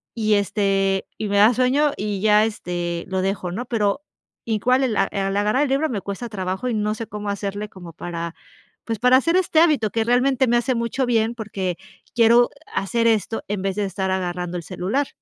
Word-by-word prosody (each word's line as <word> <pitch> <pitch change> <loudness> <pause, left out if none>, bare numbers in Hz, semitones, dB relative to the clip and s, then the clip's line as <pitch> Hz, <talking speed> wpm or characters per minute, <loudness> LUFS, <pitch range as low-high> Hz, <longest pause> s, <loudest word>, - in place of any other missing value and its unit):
y, 215 -2 +2
este, 195 -1 +1
y 215 - -3
me 200 - +1
da 220 +4 +6
sueño 270 +4 +2
y 205 -1 -3
ya, 215 0 +5
este, 175 -5 -3
lo 190 0 -1
dejo, 190 -2 -2
¿no? 230 +8 -4
Pero 215 -1 0 0.5
igual 240 +4 +2
el 240 -5 0
a 195 - +4
al 195 0 -2
agarrar 210 +7 +2
el 285 - -1
libro 280 +4 +1
me 215 -5 -2
cuesta 200 +5 -5
trabajo 190 +3 -3
y 240 - -1
no 210 0 0
sé, 230 - -5
cómo 210 0 -5
hacerle 200 +1 -4
como 175 -4 -11
para, 170 0 -5 0.5
pues, 225 -2 -3
para 250 +2 +6
hacer 335 +7 +2
este 335 -4 +2
hábito 285 - +3
que 225 +1 +1
realmente 255 +2 +2
me 240 0 +3
hace 250 +2 0
mucho 235 +3 -1
bien, 230 -1 +1
porque 195 -6 -4 0.4
quiero 235 +1 +5 0.2
hacer 230 +4 0
esto 225 0 0
en 205 -1 -2
vez 195 -1 -1
de 205 - 0
estar 190 0 -2
agarrando 180 -1 -2
el 170 - -6
celular. 195 - -2
210 Hz, 205 wpm, -22 LUFS, 195-240 Hz, 0.5 s, da